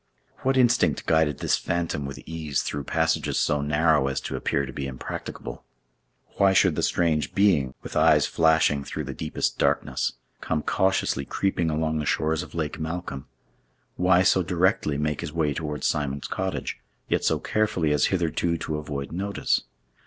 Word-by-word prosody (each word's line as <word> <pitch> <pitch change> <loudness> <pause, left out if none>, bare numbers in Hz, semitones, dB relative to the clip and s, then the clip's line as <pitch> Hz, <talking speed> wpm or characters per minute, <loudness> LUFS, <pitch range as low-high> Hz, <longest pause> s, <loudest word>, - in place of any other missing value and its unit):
What 135 0 +1
instinct 120 - +3
guided 80 -3 +2
this - - +1
phantom 85 -4 -2
with 70 - -7
ease 80 -3 -2
through 70 -1 -4
passages - - 0
so 75 -1 +1
narrow 75 -1 +2
as 65 - -1
to - - -4
appear 70 - 0
to 65 - -8
be 70 +1 -4
impracticable? 60 -2 -7 0.7
Why 100 -1 +5
should 95 - +4
the - - -1
strange 80 -3 +1
being, 75 -11 +3
with - - -8
eyes - - +5
flashing 80 -3 +3
through - - -5
the - - -5
deepest 75 - -2
darkness, - - +1 0.3
come 75 -1 -1
cautiously 95 -7 +1
creeping 90 +2 -1
along 80 0 0
the 75 - -3
shores 80 +1 +1
of 90 - -10
Lake 80 -2 -3
Malcolm? 80 -4 -5 0.7
Why 90 0 +4
so 95 -1 +4
directly 90 -4 +1
make 75 0 -1
his 75 - -5
way 80 -3 +1
towards 75 -1 -4
Simon's 70 -2 -1
cottage, 95 0 -3 0.3
yet - - 0
so - - +2
carefully 105 -8 0
as 75 - +3
hitherto 85 -2 0
to 75 -1 -3
avoid 70 -2 -5
notice? 100 +4 -1
80 Hz, 165 wpm, -25 LUFS, 75-90 Hz, 0.7 s, Why